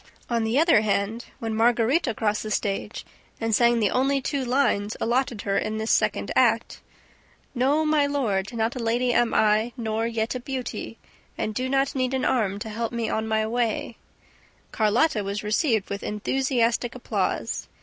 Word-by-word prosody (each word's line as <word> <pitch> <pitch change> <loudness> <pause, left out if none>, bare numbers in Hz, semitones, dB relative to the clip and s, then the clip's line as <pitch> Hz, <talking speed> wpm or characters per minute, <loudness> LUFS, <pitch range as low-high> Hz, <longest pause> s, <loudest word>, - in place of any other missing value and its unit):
On 230 -1 +1
the 220 +3 0
other 320 -8 +5
hand, 215 +2 -1
when 225 -1 -4
Margarita 235 +4 +2
crossed 210 -1 0
the 215 - -5
stage 200 -1 -2 0.3
and 225 -1 -1
sang 235 +1 +4
the 210 -4 +2
only 270 +2 +2
two 275 +1 -2
lines 240 -5 +1
allotted 240 -2 0
her 200 -1 +1
in 215 0 -3
this 220 +1 -1
second - - +1
act: - - +2 0.7
"No, 280 +5 +2
my 305 -2 +3
lord, 215 -9 -1
not 230 0 -1
a - - -4
lady 240 +2 +1
am 240 -1 +2
I, 215 +2 +3
nor 225 -1 -1
yet 225 -1 -2
a 255 - -3
beauty, 255 0 -5 0.4
And 215 - -2
do 255 +4 -2
not 270 0 +1
need 260 -1 0
an 260 - -1
arm 210 -6 +1
to 220 - -5
help 225 +1 -3
me 230 -2 -2
on 220 0 -1
my 220 0 +1
way," 230 0 -1 0.8
Carlotta 220 +2 +2
was 200 +2 -4
received 215 -1 0
with 200 - -3
enthusiastic 240 +2 0
applause. 250 - -2
230 Hz, 170 wpm, -25 LUFS, 215-255 Hz, 0.8 s, other